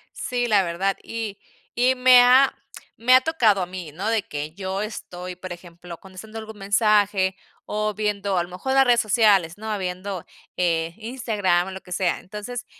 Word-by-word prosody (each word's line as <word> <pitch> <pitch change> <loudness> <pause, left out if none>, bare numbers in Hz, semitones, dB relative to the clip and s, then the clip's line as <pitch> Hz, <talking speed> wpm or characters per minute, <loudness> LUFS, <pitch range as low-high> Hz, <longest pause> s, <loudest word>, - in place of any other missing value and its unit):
Sí, 245 -1 -2
la 205 -4 +4
verdad. 185 +3 -1
Y 220 -3 -5 0.4
y 250 +2 +3
me 250 -1 +7
ha 255 +2 +6 0.4
me 245 +3 +3
ha 255 - +6
tocado 235 - +2
a - - -1
mí, 175 -4 -8
¿no?, 195 +6 -3
de 225 -3 +1
que 150 -1 -6
yo 190 0 -3
estoy, 180 -4 -7
por 185 -1 -7
ejemplo, 175 0 -11
contestando 195 +4 -11
algún 220 -1 -8
mensaje 200 -2 +2 0.3
o 215 0 -2
viendo 200 -2 -1
a 175 - +2
lo 175 - -10
mejor 225 +9 -3
las 270 - +6
redes 245 -2 +4
sociales, 205 -6 +3
¿no?, 215 0 -4
viendo, 185 0 -5 0.3
eh, 165 -2 0
Instagram 215 -6 -1
o - - -7
lo 190 - -7
que 180 - -9
sea, 180 -2 0
entonces, 210 +5 -7
200 Hz, 185 wpm, -23 LUFS, 180-225 Hz, 0.4 s, me